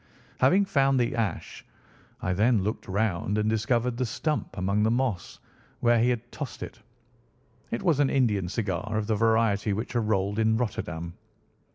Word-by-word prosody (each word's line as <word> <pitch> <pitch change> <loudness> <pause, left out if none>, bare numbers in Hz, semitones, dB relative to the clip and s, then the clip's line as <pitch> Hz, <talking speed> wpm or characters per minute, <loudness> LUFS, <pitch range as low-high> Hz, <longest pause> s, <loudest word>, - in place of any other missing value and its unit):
Having 185 +10 +4
found 135 -6 +2
the 120 0 0
ash, 115 -4 -3 0.6
I 90 - 0
then 105 +1 +3
looked 105 +3 -3
round 100 0 0
and 105 0 +1
discovered 115 +2 0
the 130 - 0
stump 150 +4 -3
among 100 +3 +1
the 110 - +3
moss 120 -8 -1 0.4
where 120 -1 +3
he 120 +2 +3
had 120 -1 -3
tossed 145 -4 -6
it. - - -9 0.9
It 115 - -3
was 160 -6 +2
an 140 -2 +3
Indian 105 -9 +1
cigar, 105 +1 -2
of 110 - -1
the 110 - 0
variety 110 -2 +2
which 110 +4 -4
are 120 - +3
rolled 100 -1 0
in 110 0 +3
Rotterdam." 85 -7 -3
110 Hz, 170 wpm, -27 LUFS, 100-125 Hz, 0.9 s, Having